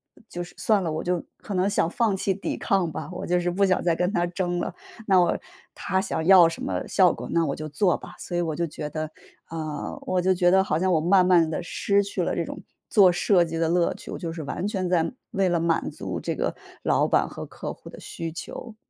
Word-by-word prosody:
呃 -, -, -21 dB
就 175 Hz, -, -4 dB
是 175 Hz, -, -13 dB
算 215 Hz, -3 st, +2 dB
了， 170 Hz, -3 st, -2 dB
我 155 Hz, +1 st, -3 dB
就 175 Hz, -1 st, -1 dB
可 205 Hz, -, -7 dB
能 185 Hz, +1 st, +2 dB
想 200 Hz, -, +2 dB
放 225 Hz, -5 st, +1 dB
弃 195 Hz, +1 st, 0 dB
抵 195 Hz, -, -4 dB
抗 185 Hz, -4 st, +1 dB
吧， -, -, -5 dB
我 -, -, -5 dB
就 180 Hz, 0 st, +2 dB
是 175 Hz, 0 st, -1 dB
不 195 Hz, +3 st, +1 dB
想 185 Hz, -1 st, +1 dB
再 170 Hz, -2 st, +2 dB
跟 180 Hz, +3 st, 0 dB
他 175 Hz, -4 st, +1 dB
争 175 Hz, 0 st, -2 dB
了， 175 Hz, -, -3 dB, 0.3 s
那 190 Hz, -2 st, +5 dB
我 175 Hz, -, +2 dB, 0.4 s
他 190 Hz, -1 st, 0 dB
想 160 Hz, -, -2 dB
要 180 Hz, -2 st, +8 dB
什 165 Hz, -, -7 dB
么 -, -, -3 dB
效 185 Hz, -2 st, +4 dB
果， -, -, -7 dB
那 170 Hz, -1 st, +2 dB
我 140 Hz, -, -2 dB
就 155 Hz, 0 st, -6 dB
做 180 Hz, +5 st, +2 dB
吧。 -, -, -12 dB
所 175 Hz, -, -5 dB
以 175 Hz, -, +1 dB
我 160 Hz, -3 st, -2 dB
就 170 Hz, -, 0 dB
觉 150 Hz, -1 st, -6 dB
得， 155 Hz, +1 st, -4 dB, 0.3 s
啊， 155 Hz, -2 st, -5 dB
我 185 Hz, -, 0 dB
就 185 Hz, +1 st, +3 dB
觉 175 Hz, -1 st, +3 dB
得 190 Hz, +1 st, +5 dB
好 155 Hz, -4 st, 0 dB
像 185 Hz, +1 st, +1 dB
我 165 Hz, -, +3 dB
慢 180 Hz, +4 st, +4 dB
慢 175 Hz, -3 st, +5 dB
地 165 Hz, -, -2 dB
失 200 Hz, +3 st, +1 dB
去 200 Hz, -, -2 dB
了 -, -, -1 dB
这 -, -, 0 dB
种 -, -, -8 dB, 0.3 s
做 195 Hz, -5 st, +6 dB
设 175 Hz, 0 st, +3 dB
计 165 Hz, 0 st, -4 dB
的 165 Hz, 0 st, +1 dB
乐 170 Hz, 0 st, +2 dB
趣， -, -, -10 dB
我 -, -, -4 dB
就 165 Hz, -1 st, -5 dB
是 165 Hz, -2 st, -6 dB
完 180 Hz, +7 st, -3 dB
全 190 Hz, -4 st, -2 dB
在 165 Hz, -2 st, +2 dB, 0.2 s
为 195 Hz, -1 st, +1 dB
了 175 Hz, -1 st, +1 dB
满 165 Hz, -1 st, +1 dB
足 -, -, -5 dB
这 -, -, -3 dB
个 -, -, -1 dB, 0.3 s
老 -, -, +2 dB
板 -, -, +2 dB
和 -, -, -7 dB
客 -, -, -6 dB
户 -, -, -12 dB
的 -, -, -12 dB
需 165 Hz, -1 st, -5 dB
求。 220 Hz, +6 st, -8 dB
175 Hz, 275 characters per minute, -25 LUFS, 165-190 Hz, 0.4 s, 要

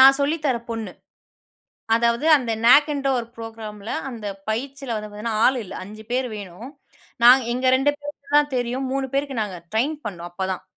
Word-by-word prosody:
நான் 270 Hz, +1 st, +8 dB
சொல்லி 290 Hz, +4 st, +2 dB
தர 255 Hz, -4 st, +2 dB
பொண்ணு. 225 Hz, -5 st, -4 dB, 1.0 s
அதாவது 235 Hz, +4 st, +1 dB
அந்த 245 Hz, -4 st, -3 dB
நாக்ன்ற 285 Hz, +2 st, +5 dB
ஒரு 230 Hz, -, -6 dB
புரோகிராம் 225 Hz, -2 st, -8 dB
ல, -, -, -3 dB, 0.2 s
அந்த 230 Hz, -4 st, -8 dB, 0.2 s
பயிற்சில 265 Hz, +2 st, -3 dB
வந்து 210 Hz, 0 st, -5 dB
பாத்தீங்கன்னா, 215 Hz, +2 st, -3 dB
ஆள் 260 Hz, +1 st, +4 dB
இல்ல 195 Hz, -, -10 dB
5 215 Hz, +3 st, -10 dB
பேரு 255 Hz, +1 st, 0 dB
வேணும், 200 Hz, +4 st, -8 dB, 0.5 s
நா 240 Hz, -, +10 dB, 0.2 s
எங்க 255 Hz, +1 st, -2 dB
2 270 Hz, +3 st, +3 dB
பேருக்கு 290 Hz, 0 st, -5 dB
தான் 295 Hz, -2 st, +2 dB
தெரியும். 250 Hz, +2 st, -2 dB
3 270 Hz, -1 st, -1 dB
பேருக்கு 275 Hz, -2 st, -1 dB
நாங்க 190 Hz, -3 st, -6 dB, 0.2 s
ட்ரெயின் 270 Hz, +8 st, +1 dB
பண்ணோம் 175 Hz, -4 st, -5 dB
அப்பதான். 190 Hz, +1 st, -3 dB
240 Hz, 175 wpm, -23 LUFS, 215-275 Hz, 1.0 s, நா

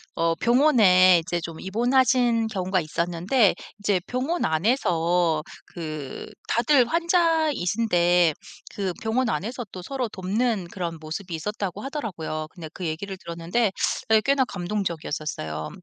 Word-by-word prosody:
어 165 Hz, 0 st, +1 dB
병원에 205 Hz, -, +5 dB
이제 175 Hz, 0 st, -1 dB
좀 165 Hz, -1 st, -7 dB
입원하신 240 Hz, +2 st, +2 dB
경우가 185 Hz, -3 st, -1 dB
있었는데 175 Hz, -, +1 dB, 0.2 s
이제 205 Hz, -2 st, +1 dB
병원 270 Hz, +8 st, -2 dB
안에서 170 Hz, -, +1 dB, 0.3 s
그 155 Hz, -5 st, -6 dB, 0.2 s
다들 245 Hz, +1 st, +4 dB
환자이신데 230 Hz, -, +2 dB, 0.4 s
그 190 Hz, -3 st, -2 dB
병원 230 Hz, +2 st, 0 dB
안에서 235 Hz, +3 st, -3 dB
또 185 Hz, -, -7 dB
서로 260 Hz, +5 st, -3 dB
돕는 200 Hz, 0 st, -1 dB
그런 170 Hz, -3 st, -4 dB
모습이 165 Hz, +3 st, -6 dB
있었다고 200 Hz, +3 st, -4 dB
하더라고요. 180 Hz, -, -4 dB
근데 165 Hz, -4 st, -9 dB
그 185 Hz, -, -6 dB
얘기를 185 Hz, +5 st, -4 dB
들었는데 175 Hz, +6 st, -1 dB, 0.4 s
네 220 Hz, -1 st, +5 dB
꽤나 275 Hz, +1 st, +3 dB
감동적이었었어요. 160 Hz, -, -4 dB
190 Hz, 300 characters per minute, -25 LUFS, 170-240 Hz, 0.4 s, 병원에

